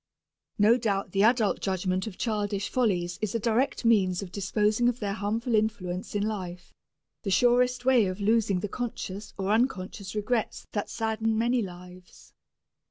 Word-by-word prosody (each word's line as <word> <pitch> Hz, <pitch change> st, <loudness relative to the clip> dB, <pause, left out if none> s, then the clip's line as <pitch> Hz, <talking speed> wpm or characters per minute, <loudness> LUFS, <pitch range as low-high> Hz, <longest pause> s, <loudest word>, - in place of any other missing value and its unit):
No 215 Hz, +4 st, +5 dB
doubt 200 Hz, -5 st, -1 dB
the 195 Hz, -, +1 dB
adult 225 Hz, -1 st, +3 dB
judgment 190 Hz, 0 st, -1 dB
of 200 Hz, -, -7 dB
childish 205 Hz, -3 st, -1 dB
follies 180 Hz, -8 st, 0 dB
is 215 Hz, 0 st, -2 dB
a -, -, +1 dB
direct 235 Hz, +4 st, 0 dB
means 195 Hz, -5 st, +3 dB
of 180 Hz, -, -9 dB
disposing 210 Hz, +4 st, +1 dB
of 245 Hz, 0 st, -3 dB
their 200 Hz, -2 st, -2 dB
harmful 225 Hz, +4 st, -2 dB
influence 210 Hz, -4 st, -1 dB
in 205 Hz, -, +1 dB
life, 185 Hz, -5 st, -5 dB, 0.5 s
the 200 Hz, -, -3 dB
surest 245 Hz, +4 st, +3 dB
way 250 Hz, -6 st, +5 dB
of 185 Hz, +2 st, -4 dB
losing 205 Hz, -3 st, +2 dB
the 210 Hz, -, -2 dB
conscious 210 Hz, -3 st, -5 dB
or 195 Hz, 0 st, -1 dB
unconscious 205 Hz, -4 st, -1 dB
regrets 215 Hz, +2 st, -1 dB
that 205 Hz, -, -3 dB
sadden 220 Hz, 0 st, -1 dB
many 240 Hz, +2 st, +2 dB
lives. 180 Hz, -1 st, -11 dB
210 Hz, 160 wpm, -27 LUFS, 190-230 Hz, 0.5 s, No